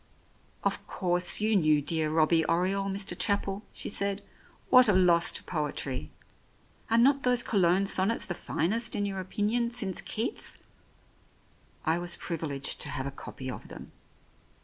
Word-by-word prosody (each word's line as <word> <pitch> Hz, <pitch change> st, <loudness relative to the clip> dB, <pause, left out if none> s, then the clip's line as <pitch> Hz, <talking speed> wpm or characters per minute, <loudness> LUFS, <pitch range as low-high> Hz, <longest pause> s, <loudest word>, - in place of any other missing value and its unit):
"Of -, -, -2 dB
course, 180 Hz, +1 st, 0 dB
you 215 Hz, 0 st, +2 dB
knew 155 Hz, -5 st, +4 dB
dear 155 Hz, +2 st, 0 dB
Robbie 160 Hz, +1 st, +3 dB
Oriole, 190 Hz, +3 st, 0 dB
Mr. 195 Hz, 0 st, -1 dB
Chapel," 200 Hz, 0 st, -1 dB
she -, -, -5 dB
said. 200 Hz, 0 st, -2 dB, 0.5 s
"What 255 Hz, -3 st, +7 dB
a -, -, +5 dB
loss 175 Hz, -2 st, +4 dB
to -, -, -4 dB
poetry. 140 Hz, -, -3 dB, 0.8 s
Are 230 Hz, -, +3 dB
not 275 Hz, +4 st, +4 dB
those 250 Hz, -1 st, +2 dB
Cologne 190 Hz, -4 st, +2 dB
sonnets 195 Hz, +3 st, +1 dB
the 175 Hz, -, -2 dB
finest 220 Hz, +8 st, -1 dB
in 205 Hz, -, -1 dB
your 195 Hz, -1 st, -4 dB
opinion 215 Hz, +5 st, -1 dB
since 210 Hz, -6 st, +1 dB
Keats? 225 Hz, -, -2 dB, 1.2 s
I 160 Hz, +1 st, +1 dB
was 175 Hz, 0 st, -2 dB
privileged 150 Hz, -5 st, -3 dB
to 150 Hz, -, -1 dB
have 135 Hz, -2 st, -4 dB
a 140 Hz, -, -4 dB
copy 130 Hz, -1 st, -9 dB
of -, -, -9 dB
them. -, -, -11 dB
185 Hz, 150 wpm, -28 LUFS, 160-210 Hz, 1.2 s, What